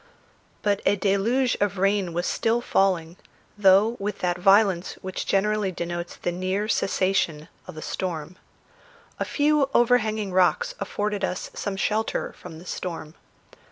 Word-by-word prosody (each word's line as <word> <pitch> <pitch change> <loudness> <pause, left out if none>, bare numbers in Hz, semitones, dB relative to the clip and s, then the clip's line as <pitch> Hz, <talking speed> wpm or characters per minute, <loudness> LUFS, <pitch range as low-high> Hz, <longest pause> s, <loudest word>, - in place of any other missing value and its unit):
But 205 -1 +1
a 205 - +3
deluge 210 +6 +1
of 205 -1 +1
rain 195 -1 +1
was 175 +1 -2
still 230 +1 +1
falling, 185 -7 +1 0.4
though 205 +3 +4
with 205 +1 -3
that 180 0 -1
violence 195 -1 +4
which 185 0 -4
generally 210 0 +1
denotes 175 0 -5
the 175 - -3
near 185 +4 -2
cessation 185 -6 0 0.2
of - - -9
a 155 - -6
storm. 170 -2 -4 0.8
A - - 0
few 295 -2 +2
overhanging 220 -5 +2
rocks 190 - +2
afforded 205 -1 -2
us 185 0 -3
some 195 -1 -4
shelter 215 +3 -1
from 165 -3 -11
the 170 - -12
storm. 165 -4 -5
195 Hz, 140 wpm, -25 LUFS, 180-210 Hz, 0.8 s, though